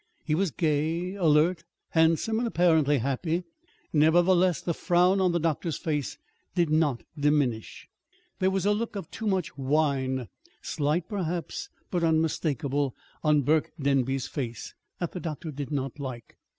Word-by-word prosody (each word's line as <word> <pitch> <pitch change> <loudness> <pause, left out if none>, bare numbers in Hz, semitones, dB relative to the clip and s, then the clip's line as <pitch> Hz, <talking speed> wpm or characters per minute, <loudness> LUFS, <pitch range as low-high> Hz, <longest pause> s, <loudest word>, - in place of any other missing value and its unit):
He 155 - 0
was 185 +4 +2
gay, 160 +4 0
alert, 165 -2 +3 0.3
handsome, 165 +7 +2
and 240 - 0
apparently 160 -7 +3
happy. 150 +8 -1 0.5
Nevertheless, 175 +2 +4
the 170 - -2
frown 180 +3 +3
on 185 -1 +3
the 170 - +1
doctor's 165 0 -1
face 150 -4 -2 0.4
did 170 -4 +2
not 155 -6 +2
diminish. 145 -7 0 0.5
There 185 - +3
was 190 0 -1
a 205 - +4
look 225 +1 -3
of 195 -6 -6
too 220 - -4
much 190 -8 -1
wine 135 -3 +1 0.3
slight, 155 +4 -1
perhaps, 180 - -3 0.2
but 175 -2 0
unmistakable 150 -4 0 0.3
on 150 -2 +4
Burke 155 +3 +1
Denby's 135 -2 +1
face, 120 -5 -5 0.2
that 175 - -3
the 180 - -5
doctor 160 -1 -5
did 140 -2 -5
not 135 -1 -3
like. 130 -4 -7
160 Hz, 145 wpm, -27 LUFS, 145-175 Hz, 0.5 s, Nevertheless